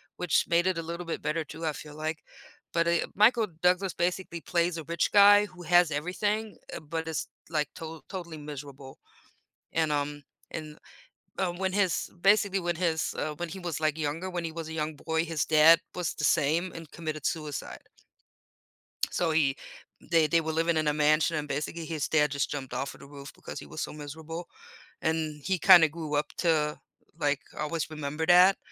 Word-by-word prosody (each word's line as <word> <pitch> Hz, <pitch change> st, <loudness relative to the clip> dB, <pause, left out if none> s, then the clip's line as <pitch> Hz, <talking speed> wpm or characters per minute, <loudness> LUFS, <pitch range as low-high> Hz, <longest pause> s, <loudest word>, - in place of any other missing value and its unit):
which 180 Hz, -4 st, +1 dB
made 170 Hz, +2 st, +3 dB
it 185 Hz, -2 st, +1 dB
a -, -, -1 dB
little 170 Hz, +2 st, -6 dB
bit 165 Hz, -, -4 dB
better 155 Hz, +2 st, -1 dB
too, 160 Hz, +2 st, -8 dB
I 155 Hz, -, 0 dB
feel 150 Hz, 0 st, -10 dB
like, 155 Hz, +1 st, -4 dB, 0.5 s
but, 170 Hz, 0 st, +2 dB
eh, 170 Hz, 0 st, +2 dB
Michael 220 Hz, +2 st, +5 dB
Douglas 180 Hz, +1 st, +2 dB
basically 175 Hz, 0 st, -2 dB
plays 170 Hz, 0 st, 0 dB
a 160 Hz, -, -6 dB
rich 170 Hz, +2 st, 0 dB
guy 205 Hz, 0 st, +7 dB
who 180 Hz, -3 st, -13 dB
has 175 Hz, -1 st, +4 dB
everything, 205 Hz, +8 st, -2 dB
eh -, -, -6 dB
but 160 Hz, +1 st, -5 dB
it's 160 Hz, -, -3 dB, 0.2 s
like 150 Hz, -3 st, 0 dB
to 160 Hz, 0 st, -8 dB
totally 170 Hz, -4 st, -6 dB
miserable, 140 Hz, -2 st, -9 dB, 0.7 s
and, 160 Hz, -2 st, +1 dB
um, 145 Hz, 0 st, -2 dB, 0.3 s
and, 155 Hz, -1 st, -7 dB, 0.6 s
uh, 185 Hz, -2 st, +1 dB
when 185 Hz, +2 st, -2 dB
his 195 Hz, -3 st, +1 dB
basically 200 Hz, 0 st, +4 dB
when 175 Hz, -1 st, -1 dB
his, 160 Hz, -2 st, 0 dB
uh, 155 Hz, -, -2 dB
when 175 Hz, +3 st, -4 dB
he 190 Hz, -, -7 dB
was 175 Hz, -4 st, -4 dB
like 155 Hz, -1 st, 0 dB
younger, 160 Hz, +4 st, -2 dB
when 175 Hz, -2 st, -3 dB
he 165 Hz, -, -3 dB
was 165 Hz, -1 st, -6 dB
a -, -, -6 dB
young 155 Hz, -1 st, -2 dB
boy, 160 Hz, +2 st, -1 dB
his 160 Hz, -3 st, -1 dB
dad 160 Hz, +1 st, +7 dB, 0.2 s
was 180 Hz, -3 st, -2 dB
the -, -, -5 dB
same 165 Hz, +4 st, +2 dB
and 165 Hz, -3 st, -10 dB
committed 155 Hz, -3 st, -5 dB
suicide. 150 Hz, -4 st, -3 dB, 1.3 s
So 170 Hz, -2 st, 0 dB
he 145 Hz, -4 st, +2 dB, 0.5 s
they 165 Hz, -2 st, +5 dB
they 165 Hz, +2 st, +3 dB
were 160 Hz, 0 st, -3 dB
living 165 Hz, +1 st, +1 dB
in 155 Hz, -1 st, +1 dB
a 150 Hz, -, +2 dB
mansion 155 Hz, +2 st, +3 dB
and 150 Hz, 0 st, -3 dB
basically 155 Hz, +4 st, -3 dB
his 155 Hz, -2 st, -2 dB
dad 150 Hz, -2 st, +3 dB
just 140 Hz, 0 st, -1 dB
jumped 135 Hz, -4 st, -5 dB
off 135 Hz, +2 st, -3 dB
of -, -, -16 dB
the -, -, -11 dB
roof 140 Hz, -1 st, -10 dB
because -, -, -8 dB
he -, -, -8 dB
was -, -, -7 dB
so -, -, -3 dB
miserable 160 Hz, +3 st, -7 dB, 0.6 s
and 155 Hz, -2 st, -1 dB
he 190 Hz, -1 st, +1 dB
kinda 170 Hz, -2 st, +8 dB
grew 155 Hz, -1 st, -4 dB
up 145 Hz, -, +1 dB
to, 155 Hz, -3 st, +2 dB, 0.4 s
like, 145 Hz, -3 st, +1 dB, 0.2 s
always 160 Hz, +1 st, -2 dB
remember 155 Hz, 0 st, -3 dB
that 180 Hz, +3 st, +7 dB
160 Hz, 195 wpm, -28 LUFS, 150-175 Hz, 1.3 s, kinda